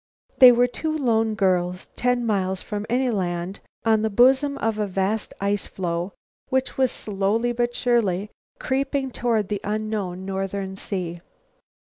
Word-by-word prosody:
They 255 Hz, -1 st, +11 dB
were 245 Hz, +1 st, +4 dB
two 310 Hz, +6 st, -2 dB
lone 225 Hz, -5 st, +1 dB
girls 180 Hz, -3 st, +1 dB
ten 245 Hz, -1 st, +1 dB
miles 190 Hz, -3 st, 0 dB
from 210 Hz, 0 st, -4 dB
any 250 Hz, +1 st, +1 dB
land, 180 Hz, -2 st, -2 dB, 0.3 s
on 220 Hz, -1 st, +4 dB
the 220 Hz, -, +1 dB
bosom 265 Hz, +6 st, +4 dB
of 220 Hz, -1 st, -1 dB
a 210 Hz, -, 0 dB
vast 195 Hz, +3 st, -1 dB
ice 200 Hz, +1 st, -1 dB
floe, 175 Hz, 0 st, -3 dB, 0.4 s
which 260 Hz, 0 st, 0 dB
was 260 Hz, -2 st, +2 dB
slowly 210 Hz, +4 st, -1 dB
but 240 Hz, 0 st, -1 dB
surely 215 Hz, -5 st, +1 dB, 0.3 s
creeping 270 Hz, 0 st, -1 dB
toward 230 Hz, -5 st, 0 dB
the 205 Hz, -1 st, -2 dB
unknown 205 Hz, -3 st, -3 dB
northern 195 Hz, 0 st, -3 dB
sea. 180 Hz, -4 st, -4 dB
215 Hz, 145 wpm, -24 LUFS, 190-245 Hz, 0.4 s, They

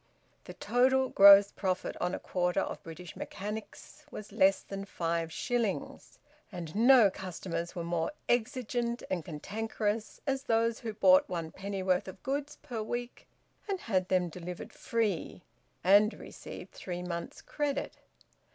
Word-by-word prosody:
The -, -, -9 dB
total 260 Hz, +1 st, +2 dB
gross 200 Hz, 0 st, +8 dB
profit 185 Hz, -2 st, -2 dB
on 180 Hz, +1 st, 0 dB
a -, -, -5 dB
quarter 180 Hz, +1 st, 0 dB
of -, -, -4 dB
"British 165 Hz, +1 st, -10 dB
Mechanics" 210 Hz, +2 st, -7 dB
was 210 Hz, -, -9 dB
less 195 Hz, -2 st, +3 dB
than 195 Hz, 0 st, -6 dB
five 165 Hz, -3 st, -2 dB
shillings, 235 Hz, +1 st, -2 dB, 0.3 s
and 170 Hz, -4 st, -6 dB
no 235 Hz, -2 st, +7 dB
customers 175 Hz, -2 st, -5 dB
were 170 Hz, -, -3 dB
more 170 Hz, -1 st, -1 dB, 0.2 s
exigent 240 Hz, 0 st, 0 dB
and 180 Hz, -3 st, -1 dB
cantankerous 210 Hz, +6 st, -3 dB
than 270 Hz, -2 st, 0 dB
those 230 Hz, 0 st, +2 dB
who 225 Hz, -4 st, -5 dB
bought 280 Hz, +6 st, +5 dB
one 165 Hz, -3 st, -3 dB
pennyworth 190 Hz, -2 st, -1 dB
of 190 Hz, -, -10 dB
goods 280 Hz, +2 st, -3 dB
per 230 Hz, -3 st, -4 dB
week, 240 Hz, +3 st, -5 dB, 0.4 s
and 390 Hz, -2 st, -1 dB
had 185 Hz, -4 st, 0 dB
them 180 Hz, -2 st, +2 dB
delivered 175 Hz, +1 st, -8 dB
free, 210 Hz, -6 st, -2 dB, 0.4 s
and 205 Hz, +4 st, +5 dB
received -, -, -10 dB
three 180 Hz, -1 st, -6 dB
months' 170 Hz, -1 st, -5 dB
credit. 290 Hz, -2 st, -2 dB
200 Hz, 140 wpm, -31 LUFS, 180-235 Hz, 0.4 s, gross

